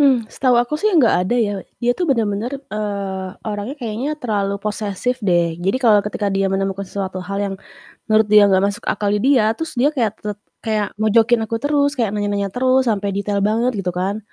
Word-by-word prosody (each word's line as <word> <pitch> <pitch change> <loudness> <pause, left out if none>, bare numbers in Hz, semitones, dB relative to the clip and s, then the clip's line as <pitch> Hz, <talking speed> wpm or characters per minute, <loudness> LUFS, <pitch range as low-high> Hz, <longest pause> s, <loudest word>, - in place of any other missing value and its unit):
Mmm, 265 -5 +4
setahu 255 -2 +2
aku 240 +5 +1
sih 430 - +3
nggak 250 -7 +5
ada 185 +6 0
ya. 220 -4 +1 0.2
Dia 240 0 +1
tuh 350 +6 -2
bener-bener, 225 -2 0 0.2
eee, 200 -3 -3 0.2
orangnya 215 +6 -4
kayaknya 240 0 -4
terlalu 205 -7 -1
posesif 210 +4 -3
deh. 175 -5 +2
Jadi, 195 +6 +1
kalau 225 -5 +4
ketika 205 -1 -2
dia 195 0 +1
menemukan 195 0 -2
suatu 190 -1 -4
hal 190 +2 -5
yang 195 -1 -3 0.6
menurut 215 0 +4
dia 210 0 +7
nggak 190 0 +3
masuk 200 - -5
akal 205 - -1
di - - 0
dia, 255 -5 +4
terus 320 -4 -5
dia 275 +4 +4
kayak 220 -5 -1
tet 210 -1 -4 0.3
kayak 215 -2 -1
mojokin 225 +2 +3
aku 230 - -2
terus, 285 +2 +1
kayak 230 -6 0
nanya-nanya 205 -1 -1
terus 255 +3 +2
sampai 200 -3 0
detail 200 0 -1
banget, 225 +4 +2
gitu 180 -2 -2
kan. 195 +4 -1
210 Hz, 195 wpm, -19 LUFS, 200-245 Hz, 0.6 s, dia